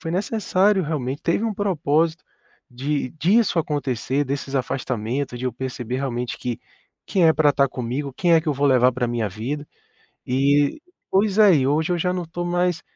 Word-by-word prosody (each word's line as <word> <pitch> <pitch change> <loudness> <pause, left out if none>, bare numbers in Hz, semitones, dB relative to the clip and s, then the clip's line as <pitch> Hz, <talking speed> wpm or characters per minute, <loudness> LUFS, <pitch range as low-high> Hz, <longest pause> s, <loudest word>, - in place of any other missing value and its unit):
foi 165 - -5
necessário 200 0 +1
realmente, 145 -2 -3
teve 170 +5 +1
um 225 - 0
propósito 165 -4 0 0.5
de 135 +3 -2
disso 195 +3 +3
acontecer, 145 -4 -1
desses 140 0 -4
afastamentos, 130 0 -2
de 125 - -5
eu 125 - -2
perceber 125 0 -4
realmente 125 -3 -3
que 120 -2 -4 0.5
quem 185 -4 +3
é 160 - +6
pra 150 -1 +3
tá 140 0 +3
comigo, 130 +3 -4
quem 175 +4 +2
é 160 - +5
que 160 - -17
eu - - +2
vou 140 +2 +1
levar 130 -2 +4
pra 125 0 -1
minha 115 -3 -1
vida. 130 +9 -5 0.6
E 140 - +2 0.3
pois 200 +1 +2
é, 205 -4 +7
e 130 -2 +1
hoje 155 +4 +1
eu 175 - 0
já 180 +2 0
não 180 -1 -3
tô 175 +2 -5
mais, 175 0 0
145 Hz, 185 wpm, -22 LUFS, 130-175 Hz, 0.6 s, é